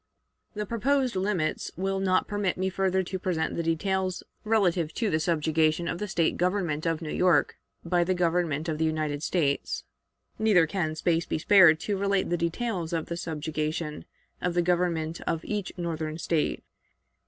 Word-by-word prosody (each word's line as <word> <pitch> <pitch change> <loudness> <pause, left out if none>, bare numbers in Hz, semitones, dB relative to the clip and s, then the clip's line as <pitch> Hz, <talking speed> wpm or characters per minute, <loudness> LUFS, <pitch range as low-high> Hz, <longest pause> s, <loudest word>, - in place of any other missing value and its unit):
The 210 0 -2
proposed 255 +3 +1
limits 185 -5 -1
will 195 +1 -1
not 185 -1 +2
permit 205 -3 -1
me 190 +1 -1
further 190 0 +1
to 185 +1 -4
present 170 -4 -1
the - - -1
details 185 +3 -1 0.2
relative 185 -7 +1
to 220 -4 0
the 155 - +2
subjugation 160 0 +1
of 170 - -3
the 210 - -3
State 165 -3 +1
government 175 -4 0
of 165 0 -1
New 155 - -4
York 180 -1 +3 0.3
by 175 +1 +2
the 185 +2 0
Government 170 -3 0
of 155 -1 -2
the 160 - +2
United 155 -2 -1
States. 150 -4 0 0.6
Neither 210 -6 +5
can 160 -2 -2
space 165 +1 0
be - - -1
spared 165 -2 +6
to 205 -2 -1
relate 200 -2 0
the - - +3
details 170 0 -2
of 165 -1 -2
the 170 - -2
subjugation 155 -1 -3 0.4
of 180 -1 -1
the 175 - +3
government 170 -2 0
of 165 - -1
each 205 -3 -3
Northern 160 -3 -3
State. 165 -2 -1
175 Hz, 170 wpm, -27 LUFS, 160-190 Hz, 0.6 s, spared